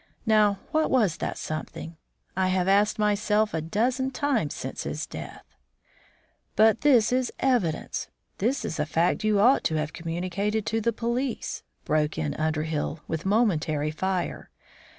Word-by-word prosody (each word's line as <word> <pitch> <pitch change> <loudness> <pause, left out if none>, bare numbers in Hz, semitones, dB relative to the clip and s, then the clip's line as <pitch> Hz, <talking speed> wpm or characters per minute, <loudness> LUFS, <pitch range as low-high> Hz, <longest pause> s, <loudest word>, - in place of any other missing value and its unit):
Now, 210 -2 +4
what 310 0 +2
was 215 -10 +2
that - - -3
something? 155 +1 -6 0.4
I 190 0 +2
have 185 0 +1
asked 205 +2 +3
myself 210 0 +2
a 160 - -1
dozen 245 - 0
times 265 - 0
since 130 - -5
his 150 +2 -3
death." - - -9 1.1
"But 220 +1 +5
this 250 -7 +5
is 255 -1 +1
evidence! 240 -12 0 0.3
This 245 +8 0
is 160 - -4
a 150 - 0
fact 165 +6 +1
you 215 -1 +3
ought 245 +7 +5
to 160 - +1
have 155 0 -2
communicated 185 +6 -2
to 225 +1 0
the 235 +2 +2
police," 235 +2 -2 0.2
broke 150 0 +1
in 150 -2 -1
Underhill, 155 0 -2
with 160 +3 -3
momentary 160 -9 +1
fire. 185 +3 -2
200 Hz, 150 wpm, -26 LUFS, 160-225 Hz, 1.1 s, But